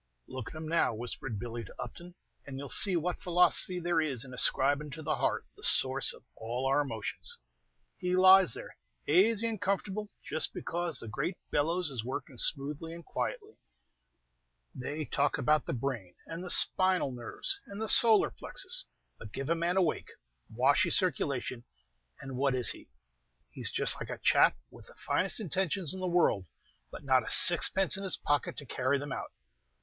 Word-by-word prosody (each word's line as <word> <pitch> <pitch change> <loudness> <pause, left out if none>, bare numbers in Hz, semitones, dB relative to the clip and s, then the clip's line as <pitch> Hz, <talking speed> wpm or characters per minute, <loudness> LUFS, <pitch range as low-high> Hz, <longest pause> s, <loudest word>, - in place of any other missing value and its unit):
"Look 130 -4 -8
at - - -14
him 155 0 -7
now," 165 -7 0
whispered 120 0 -6
Billy 120 +1 -7
to 95 - -14
Upton, 175 +1 -10 0.3
"and 135 -1 -8
you 140 - -7
'll - - -10
see 195 +6 +4
what 175 +1 -3
philosophy 180 +1 +2
there 170 -1 0
is 135 -5 -2
in 130 - -12
ascribin' 140 +4 +1
to 160 0 -8
the 155 +1 -2
heart - - -2
the - - -17
source - - +2
of - - -15
all 120 +4 -5
our 135 +2 +1
emotions. 310 - -6 0.6
He 180 -1 -2
lies 185 -6 +5
there - - -11 0.3
azy 210 +8 +2
and 220 -3 -5
comfortable 200 +1 -3 0.2
just 155 - -1
because 170 -4 -2
the 115 - -6
great 170 - -4
bellows 165 +2 -1
is 120 -5 -5
working 130 +1 -7
smoothly 150 +3 0
and 170 - -13
quietly. 435 -3 -6 1.1
They 145 +4 -6
talk 145 +1 -1
about 155 0 0
the - - -3
brain, 115 -8 -5
and 165 +2 -8
the 180 - -7
spinal 185 -7 +5
nerves, 125 - -2
and 200 +1 -9
the 220 - -2
soliar 220 -1 +6
plexus; - - -1 0.3
but 110 - -11
give 135 +6 -5
a - - +2
man 170 +2 -1
a 190 - +3
wake, 160 - -3 0.4
washy 125 +5 +1
circulation, 130 -8 -1 0.5
and 135 -2 -8
what 135 0 0
is 125 -2 +4
he? - - -12 0.6
He's - - -3
just - - +2
like - - -7
a - - -6
chap - - +3
with - - -16
the - - -17
finest 190 +5 -1
intentions 185 -3 -1
in 190 - -6
the 185 - -3
world, 170 - 0 0.4
but - - -11
not 130 -2 +2
a - - -7
sixpence 185 +2 +6
in 195 - -4
his 190 - +3
pocket 145 0 -2
to 145 - -8
carry 130 +2 -1
them 145 0 -7
out! - - -6
155 Hz, 185 wpm, -29 LUFS, 135-185 Hz, 1.1 s, soliar